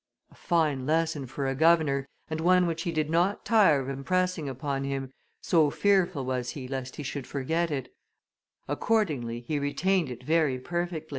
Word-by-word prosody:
A - - -19
fine 150 -6 0
lesson 160 -3 0
for 135 +2 -4
a 135 - 0
governor, 150 -2 +3 0.2
and 160 0 -3
one 180 +1 +4
which 165 -1 -2
he 170 - -2
did 155 -2 0
not 175 +5 +1
tire 205 -11 +5
of 135 - -5
impressing 165 +3 -1
upon 135 +1 -3
him, 135 -1 -4 0.3
so 160 -4 +4
fearful 185 -6 +2
was 125 -1 -2
he 130 -2 -6
lest 130 -1 -5
he 150 - -6
should 135 -1 -5
forget 160 +6 -1
it; 140 -4 -4 0.7
accordingly 145 - 0
he 145 +5 -2
retained 170 +3 +1
it 125 0 -8
very 155 -2 +2
perfectly." 170 +3 -4
150 Hz, 170 wpm, -28 LUFS, 135-170 Hz, 0.7 s, tire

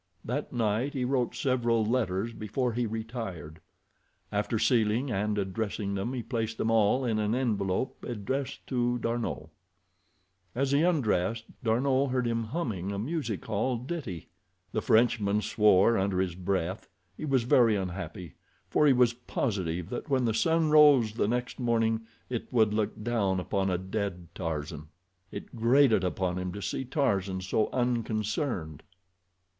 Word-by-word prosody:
That 135 +6 -3
night 115 +3 0
he 130 -3 -1
wrote 125 -2 0
several 120 -4 +1
letters 110 -2 0
before 115 +3 -2
he 120 0 0
retired. 110 - -6 0.7
After 105 +2 0
sealing 115 +2 +2
and 105 0 0
addressing 100 +1 -2
them 100 +6 -2
he 125 -3 -3
placed 115 -2 -3
them 115 - 0
all 115 +4 +3
in 110 -3 0
an 105 +2 +1
envelope 110 -3 -1
addressed 130 +4 -4
to 120 -1 0
D'Arnot. 115 -9 -3 1.1
As 135 +2 0
he 140 +1 +4
undressed 115 - +1 0.2
D'Arnot 130 +4 +2
heard 125 -1 0
him 115 -1 -1
humming 110 - -3
a 100 - -3
music 120 - -3
hall 115 +4 0
ditty. 125 - -5 0.4
The 110 - -1
Frenchman 110 -3 +3
swore 105 0 +4
under 95 -1 0
his 95 -2 0
breath. 95 +1 -2 0.3
He - - -5
was 135 -4 +2
very 115 -2 +4
unhappy, 90 -2 -5 0.4
for 150 - +4
he 140 - +6
was 125 -2 +4
positive 95 -9 -3
that 125 - -5
when 130 -3 +2
the 115 - +1
sun 160 +6 +2
rose 145 -8 +6
the 110 -2 0
next 125 +3 -2
morning 115 -2 +1 0.2
it 120 -2 -5
would 110 -4 +3
look 105 0 -2
down 105 -5 +1
upon 95 +1 -1
a 90 - +1
dead 95 -2 -4
Tarzan. 75 -3 -4 0.4
It - - -8
grated 120 -2 +4
upon 90 0 -1
him 90 0 -3
to 100 - -6
see 130 - -3
Tarzan 100 - 0
so 95 +3 0
unconcerned. 110 - -1
110 Hz, 150 wpm, -29 LUFS, 100-125 Hz, 1.1 s, he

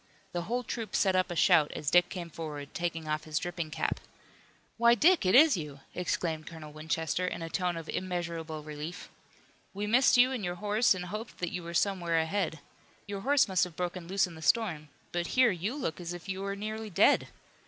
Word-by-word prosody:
The 175 - -2
whole 240 +8 -2
troop 230 -2 -4
set 190 -2 +3
up 185 0 +2
a 175 - -4
shout 150 -2 +4
as 145 - -2
Dick 175 0 +5
came 175 -3 -6
forward, 150 -3 -7
taking 165 -2 -3
off 155 0 -2
his 155 -1 -2
dripping 175 -2 -3
cap. - - -2 0.8
"Why, 235 0 +6
Dick, 320 - +4
it 185 - +4
is 300 0 +8
you!" 150 -5 -6
exclaimed 165 -3 -2
Colonel 155 -3 -9
Winchester 160 +3 -1
in 170 - -4
a 165 - -5
tone 180 -2 -1
of 165 -1 -7
immeasurable 170 -4 -4
relief. 155 +4 -7 0.7
"We 205 +1 -2
missed 245 +5 +5
you 250 +2 +6
and 250 -6 -3
your 175 -1 -2
horse 210 +3 +2
and 180 -1 -5
hoped 215 +6 -6
that 175 -1 -3
you 180 - -4
were 170 0 -7
somewhere 175 -3 +1
ahead. 160 -1 -1 0.4
Your 200 -1 -5
horse 280 +3 +4
must 185 -3 +2
have 180 -3 -4
broken 180 -1 -4
loose 195 +2 +2
in 175 - -10
the 160 - -11
storm. 160 -7 +1 0.2
But 175 -1 -1
here, 255 -3 +6
you 190 +8 -3
look 180 - -3
as 175 0 -4
if 175 +1 -9
you 190 0 -3
were 200 0 -3
nearly 215 +2 -5
dead! 180 - +4
175 Hz, 210 wpm, -30 LUFS, 160-205 Hz, 0.8 s, is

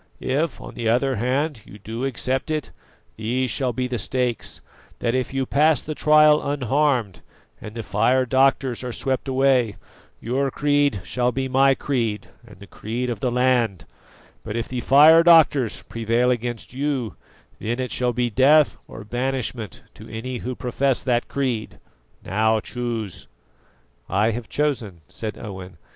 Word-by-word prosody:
If 145 +4 -1
on - - -10
the 115 -2 -2
other 130 +2 +1
hand 130 +3 -1
you 105 - -13
do 115 +4 -5
accept 130 +2 -2
it, 155 -1 -2 0.5
these 125 +4 -1
shall 130 -3 0
be 125 +2 -2
the 125 -2 -3
stakes: 125 +1 -2 0.4
that 115 - -1
if 130 -1 -1
you 135 0 -1
pass 150 +1 +3
the 155 - -5
trial 150 0 +5
unharmed, 135 - 0 0.4
and 105 +1 -9
the 115 - -4
fire 120 +6 +2
doctors 130 -1 +2
are 125 -1 -4
swept 135 +2 -2
away, 130 -5 +2 0.4
your 135 +4 -1
creed 145 -6 +1
shall 125 +3 0
be 130 +1 -2
my 135 +1 +4
creed 115 -8 -2 0.2
and 105 - -15
the 100 - -11
creed 120 +5 -4
of 120 - -4
the 130 - 0
land; 120 -6 +1 0.6
but 110 -1 -6
if 115 0 -2
the 125 - -4
fire 150 +6 +7
doctors 160 -8 +4
prevail 115 +2 0
against 120 -1 -4
you, 135 -4 -2 0.5
then 115 +3 -2
it 130 -1 -3
shall 125 -1 0
be 120 -1 -1
death 145 +5 +4
or 110 - -10
banishment 120 - -4
to - - -13
any 125 +3 -5
who 125 +2 -5
profess 130 +2 0
that 120 -2 0
creed. 125 -6 -3 0.5
Now 110 +3 +2
choose!" 115 -4 -5 0.8
"I 105 +4 +2
have 115 0 -6
chosen," 120 - -2
said 110 -1 -6
Owen. 95 -4 -9
125 Hz, 155 wpm, -23 LUFS, 115-135 Hz, 0.8 s, fire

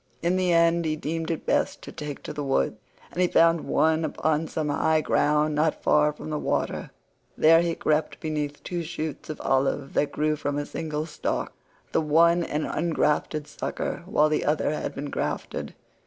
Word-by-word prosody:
In 175 +2 +2
the 185 -1 +2
end 170 0 +4
he 155 -1 0
deemed 160 +2 -3
it 165 - -3
best - - 0
to - - -8
take 150 -2 -7
to - - -6
the 145 - -4
woods, 135 -4 +1 0.4
and 180 - -2
he 180 - +4
found 165 -1 +4
one 160 +1 +2
upon 155 0 0
some 155 -1 -2
high 155 +2 +2
ground 150 0 +2
not 155 +1 0
far 150 0 +4
from 150 +1 -8
the 150 - -1
water. - - -1 0.5
There 165 +1 +6
he 170 -1 0
crept 155 0 0
beneath 150 -2 -3
two 175 -1 -3
shoots 155 -2 -5
of 155 - -5
olive 135 +1 0
that 145 -1 +1
grew 155 0 +1
from 145 0 -2
a 145 - -2
single 155 0 -3
stock—the 160 +1 -4
one 170 +3 +4
an 150 -1 -2
ungrafted 155 -2 0
sucker, 150 +2 -4
while 155 -5 +3
the 155 - 0
other 150 0 +1
had 150 - -3
been 145 +1 -5
grafted. - - -3
155 Hz, 185 wpm, -26 LUFS, 150-165 Hz, 0.5 s, There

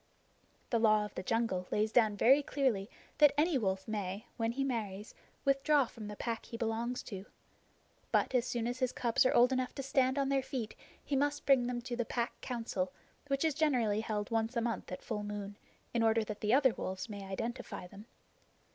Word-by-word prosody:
The 230 - +3
Law 215 -2 +4
of 210 - -9
the - - -4
Jungle 190 -4 0
lays 215 +1 +1
down 220 -3 +4
very 270 +7 +6
clearly 255 -9 0 0.3
that 295 -1 +7
any 320 +2 +3
wolf 190 -3 -1
may, 205 -1 -3
when 230 -1 -1
he 275 +2 -1
marries, 215 -6 -3 0.3
withdraw 275 +1 +4
from 225 -2 -9
the 210 - -6
Pack 230 +1 -4
he 230 - -6
belongs 230 +2 -2
to. 195 -2 -7 0.8
But - - +2
as 250 -1 +2
soon 235 -2 -1
as 245 +1 -2
his 255 -2 +1
cubs 240 +1 +2
are - - +2
old 245 +2 +6
enough 255 -1 -1
to 275 - -4
stand 265 0 +2
on 275 -1 +1
their 275 -1 +2
feet 255 -5 -4 0.3
he 285 - -1
must 290 +2 0
bring 260 -3 +5
them 245 -1 -2
to 245 0 -3
the 240 - 0
Pack 235 +1 -3
Council, 225 -7 -2 0.4
which 275 +2 +1
is 315 - +2
generally 250 -9 +2
held 215 0 -3
once 225 +2 0
a - - +2
month 230 -4 -3
at 185 - -6
full 215 -3 -3
moon, 205 -1 -5 0.4
in 235 - +1
order 225 0 +3
that 210 -1 -6
the 210 - +1
other 260 -1 +5
wolves 185 +1 -4
may 205 -3 -7
identify 210 +2 -5
them. 200 +4 -12
230 Hz, 205 wpm, -33 LUFS, 210-260 Hz, 0.8 s, that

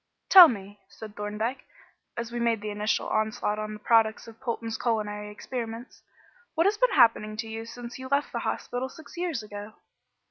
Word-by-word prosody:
"Tell 370 -3 +12
me," 205 -5 -6
said 215 -2 -11
Thorndyke, 210 +5 -3 0.5
as 235 0 -4
we 240 - -3
made 230 -2 +1
the 210 0 -4
initial 210 +1 -1
onslaught 215 -1 0
on 215 0 -4
the - - -11
products 220 0 +2
of 225 0 -13
Polton's 230 -3 -3
culinary 210 -3 -2
experiments, 230 +2 -6 0.5
"what 330 +2 +3
has 405 +2 +3
been - - +3
happening 225 -4 +4
to 225 0 -4
you 225 0 -6
since 240 +1 -9
you 260 - -6
left 280 +2 0
the - - -2
hospital 250 +2 -3
six 315 +4 -13
years 340 -9 -2
ago?" 205 0 -8
225 Hz, 180 wpm, -27 LUFS, 215-245 Hz, 0.5 s, Tell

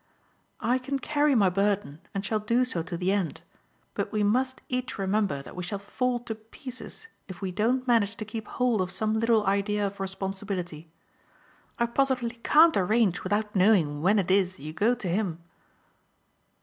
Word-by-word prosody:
"I 250 +2 +1
can 275 +2 -2
carry 290 +1 +2
my 200 -5 +4
burden 195 -5 0
and 195 0 -3
shall 215 +1 0
do 235 +4 +2
so 180 -9 -1
to 170 +1 -5
the 185 +2 0
end; 195 -5 -1 0.5
but - - -3
we 215 -1 +1
must 255 +5 +1
each 255 0 -3
remember 195 -7 0
that - - -11
we 180 - -4
shall 180 +3 -3
fall 245 +5 -1
to 235 -2 -4
pieces 250 - -8 0.2
if 185 -3 -9
we 190 -2 -3
don't 240 +7 +1
manage 225 -3 +3
to 215 - -6
keep 220 0 -6
hold 245 -5 +1
of 185 - -1
some 215 +3 0
little 230 -2 +3
idea 200 +1 +1
of 200 0 -5
responsibility. 190 -4 -4 0.9
I 235 - +2
positively 240 -1 0
can't 320 +6 +6
arrange 205 0 +2
without 210 +2 -1
knowing 180 -7 +3
when 195 +6 +4
it 190 -2 +1
is 185 -1 +2
you 155 +3 -7
go 220 +9 +2
to 225 -6 -5
him." 175 -2 -1
210 Hz, 175 wpm, -27 LUFS, 190-235 Hz, 0.9 s, can't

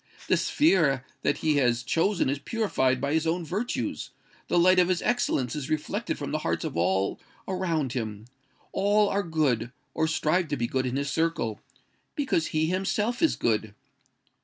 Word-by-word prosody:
The - - +4
sphere 155 - +2 0.2
that 145 - +1
he 155 -2 +3
has 120 -3 +2
chosen 170 +9 +1
is 140 +1 -1
purified 135 - 0
by 140 +2 -1
his 160 0 +1
own 170 +1 0
virtues: 210 +9 -3 0.4
the - - +1
light 185 +2 +5
of 180 - +4
his 180 -2 0
excellence 240 - 0
is 150 -1 -4
reflected 155 -1 -2
from - - -5
the - - 0
hearts - - -2
of - - -4
all 95 +3 +1 0.3
around 165 -8 -1
him. 110 -3 -4 0.5
All 205 +1 +3
are 200 - +1
good, 145 - 0 0.2
or 160 - +1
strive 160 +2 +1
to 145 -1 -2
be 120 - 0
good 130 +1 -1
in 125 - -2
his 140 0 -1
circle—because 165 - -2
he 155 0 0
himself 200 +7 -1
is 325 - +3
good. 110 -2 -1
155 Hz, 170 wpm, -27 LUFS, 130-185 Hz, 0.5 s, light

